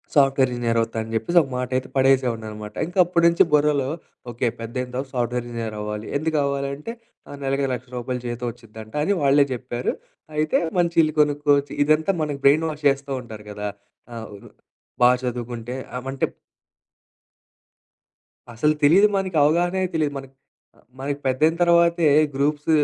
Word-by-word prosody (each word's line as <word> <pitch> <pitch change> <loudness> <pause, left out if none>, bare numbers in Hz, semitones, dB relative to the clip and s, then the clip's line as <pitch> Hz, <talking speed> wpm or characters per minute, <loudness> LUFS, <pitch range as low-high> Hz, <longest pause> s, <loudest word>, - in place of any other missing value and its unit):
Software 135 -2 +4
engineer 115 -1 0
అవుతా 115 0 -4
అని 110 - -7
జెప్పేసి, 115 +11 0
ఒక 135 - -6
మాట 125 0 -3
అయితే 130 - -4
పడేసేవాడినన్నమాట. 115 -6 0
ఇంకా 180 +2 -3
అప్పడి 170 -1 +2
నుంచి 170 - +4
బుర్రలో 145 -2 +3 0.4
ఓకే. 120 +2 -1
పెద్దయిన 125 +2 -4
తరువాత 135 +1 -4
సాఫ్ట్ 120 -1 -1
వేర్ 120 -1 -2
ఇంజినీర్ 115 -2 -5
అవ్వాలి. 105 +1 -5
ఎందుకవ్వాలంటే, 140 +1 -2 0.4
ఆహ్, 145 - -8
నెలకి 135 +1 0
రూ.1,00,000 125 0 -5
జీతం 120 +1 -4
ఒచ్చిద్దంట 110 -2 -13
అని 200 - +2
వాళ్ళే 140 0 +4
జెప్పారు. 125 0 -3 0.4
అయితే 155 0 +1 0.2
మంచి 170 -1 +1
ఇల్లు 155 - -1
కొనుక్కోవచ్చు 145 -1 +1
ఇదంతా 155 +5 +2
మన 145 -2 -2
బ్రెయిన్ 155 +4 +5
వాష్ 150 -1 -8
జేస్తూ 140 0 -2
ఉంటారు 110 -3 -11
గదా! 105 0 -4 0.5
ఆహ్, 110 -1 -7 0.7
బా 125 - +8
చదువుకుంటే 120 0 -4 0.2
ఆ! - - -1
అంటే 135 - 0 2.3
అసలు 150 +7 +2
తెలీదు 185 +8 +6
మనకి 185 -4 -2
అవగాహనే 175 +5 +2
తెలీదు 150 -3 0
మనకు 135 -1 -10 0.4
ఆహ్, - - -25 0.2
మనకు 140 +1 -3
పెద్దయిన 150 +5 +2
తర్వాతే 170 -1 +4 0.3
గ్రూప్స్ 145 +2 0
135 Hz, 145 wpm, -23 LUFS, 120-150 Hz, 2.3 s, బా